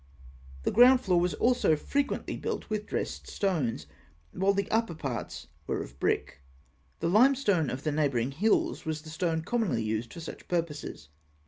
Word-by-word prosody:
The - - +1
ground 250 +3 +7
floor 180 -7 +2
was 175 -3 0
also 240 -8 +3
frequently 280 - -2
built - - -4
with 210 -1 -2
dressed - - -3
stones, 140 - -1 0.5
while 195 +2 +2
the 200 0 -1
upper 225 -6 +1
parts 135 -6 -5 0.2
were - - -1
of - - -13
brick. 70 - -1 0.6
The 165 - +1
limestone 210 - +4
of 130 +2 -5
the 155 - 0
neighbouring 140 -5 +1
hills 205 +10 +1
was 155 -1 -3
the 155 - -9
stone 160 0 -1
commonly 215 - 0
used 110 +2 -2
for 170 - -9
such 165 - -9
purposes. 155 - -3
165 Hz, 160 wpm, -29 LUFS, 145-210 Hz, 0.6 s, ground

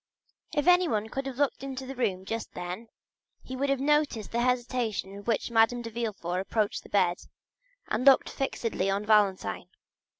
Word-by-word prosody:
If 295 - +1
anyone 340 - +3
could 270 +3 -4
have 260 -2 -6
looked 285 -2 0
into 265 -1 -5
the 265 - -6
room 195 -7 -1
just 225 +2 -4
then 180 +6 -6 0.6
he 260 - -7
would 275 +2 -1
have 275 -1 +1
noticed 290 -6 +1
the 235 - 0
hesitation 240 -5 -1
with 200 +2 -11
which 230 +1 0
Madame 235 +1 +3
de 230 - -6
Villefort 205 -6 -3
approached 210 +2 -1
the - - -16
bed 180 -3 +2 0.7
and 220 +3 -1
looked 275 -1 +6
fixedly 230 -7 -2
on 200 +2 -1
Valentine. 200 - +2
230 Hz, 170 wpm, -28 LUFS, 200-265 Hz, 0.7 s, looked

